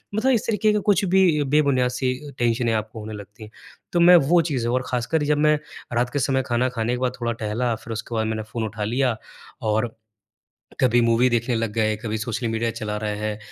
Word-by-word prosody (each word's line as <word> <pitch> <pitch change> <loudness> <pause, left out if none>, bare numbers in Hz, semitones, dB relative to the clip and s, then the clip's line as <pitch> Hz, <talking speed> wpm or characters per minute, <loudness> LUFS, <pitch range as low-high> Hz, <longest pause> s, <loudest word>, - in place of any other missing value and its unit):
मतलब 260 +5 +2
इस 230 - +1
तरीके 215 -1 +2
के 210 - +2
कुछ 195 0 +2
भी 180 -5 +3
बेबुनियाद 140 -3 +2
सी 125 0 -1 0.3
टेंशने 120 -1 +1
आपको 110 0 -3
होने 110 +1 -7
लगती 105 +1 -10
हैं। 105 - -12 0.4
तो 175 - +2
मैं 175 +1 +8
वो 175 0 +5
चीज़ें 120 -4 -1
और 130 +1 0
खासकर 125 +6 -1
जब 145 0 +1
मैं 150 0 +4 0.4
रात 120 +1 +1
के 145 - 0
समय 130 0 +1
खाना 120 +1 +1
खाने 120 -1 -2
के 125 - -2
बाद 130 -1 +1
थोड़ा 120 0 0
टहला 115 +3 0
फिर 115 +1 -8
उसके 115 +2 -5
बाद 110 0 0
मैंने 110 -1 -2
फ़ोन 110 +1 -5
उठा 105 0 -5
लिया 120 +2 0 0.5
और 110 +2 0 0.9
कभी 120 -1 +4
मूवी 115 +2 +3
देखने 120 +1 0
लग 115 -2 -2
गए, 110 -1 +1
कभी 110 0 -4
सोशल 115 +2 -3
मीडिया 115 +1 -1
चला 105 -2 -4
रहे 105 -1 -2
हैं, 105 0 -3
120 Hz, 215 wpm, -23 LUFS, 110-135 Hz, 0.9 s, मैं